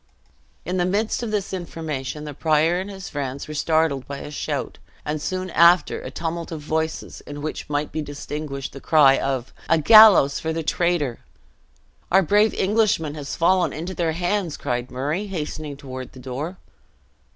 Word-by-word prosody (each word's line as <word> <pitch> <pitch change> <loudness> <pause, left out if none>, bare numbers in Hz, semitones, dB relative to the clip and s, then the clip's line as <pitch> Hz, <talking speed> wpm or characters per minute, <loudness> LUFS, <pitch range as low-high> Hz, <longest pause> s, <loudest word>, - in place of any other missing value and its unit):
In 180 +2 -2
the 175 - +2
midst 205 +6 0
of 235 - -3
this 205 -2 -2
information, 155 -6 -5
the 150 -1 -6
prior 160 +3 +2
and 190 +2 -5
his 195 -1 -8
friends 140 -1 -4
were 155 - -6
startled 155 -3 +1
by 140 - -5
a 145 - -8
shout, 145 - -4 0.3
and 150 0 -2
soon 185 +1 -3
after 170 +2 +4
a - - -6
tumult 170 0 -4
of 160 - -4
voices, 160 +2 -3
in 145 0 -7
which 155 - -5
might 145 0 -1
be 155 - -3
distinguished 145 -1 -6
the 140 - -9
cry 145 -4 +5
of 135 -2 -2 0.2
"A 165 - +5
gallows 200 -5 +7
for 160 - -2
the 165 0 -3
traitor!" 160 -7 0 0.9
"Our 190 +2 +5
brave 210 +5 +3
Englishman 195 -7 +1
has 145 -2 -6
fallen 180 +1 +2
into 170 +4 -5
their 165 -3 -1
hands," 175 0 -1
cried 120 0 -3
Murray, 150 +11 -2
hastening 155 -5 -5
toward 130 -3 -8
the 130 - -12
door. 135 +8 -5
155 Hz, 175 wpm, -23 LUFS, 145-180 Hz, 0.9 s, gallows